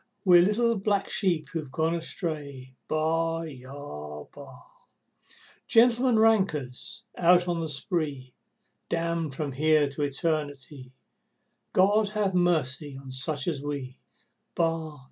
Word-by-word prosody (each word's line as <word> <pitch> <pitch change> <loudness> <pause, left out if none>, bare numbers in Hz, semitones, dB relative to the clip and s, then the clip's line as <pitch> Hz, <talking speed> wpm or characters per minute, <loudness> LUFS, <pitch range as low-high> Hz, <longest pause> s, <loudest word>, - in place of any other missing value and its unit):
We're 175 -2 +8
little 225 +4 +2
black 200 0 0
sheep 175 -6 +1
who've 155 -5 -5
gone 160 +4 0
astray, 150 -6 -5
Baa 165 +1 0
aa 130 - -8
aa! - - -12 1.0
Gentlemen 240 +1 +4
rankers 190 - +1
out 175 0 +4
on 175 -1 -1
the 160 -1 -3
spree, 140 -3 -2 0.6
Damned 165 -3 -1
from 145 -1 -3
here 155 +2 +3
to 140 +1 -6
Eternity, 145 -2 -3 0.8
God 205 +2 +3
ha' 200 -3 +1
mercy 155 -6 0
on 135 -1 -10
such 135 +3 0
as 155 -5 -1
we, 140 -3 -5 0.6
Baa! 165 -2 -1
155 Hz, 115 wpm, -27 LUFS, 140-175 Hz, 1.0 s, We're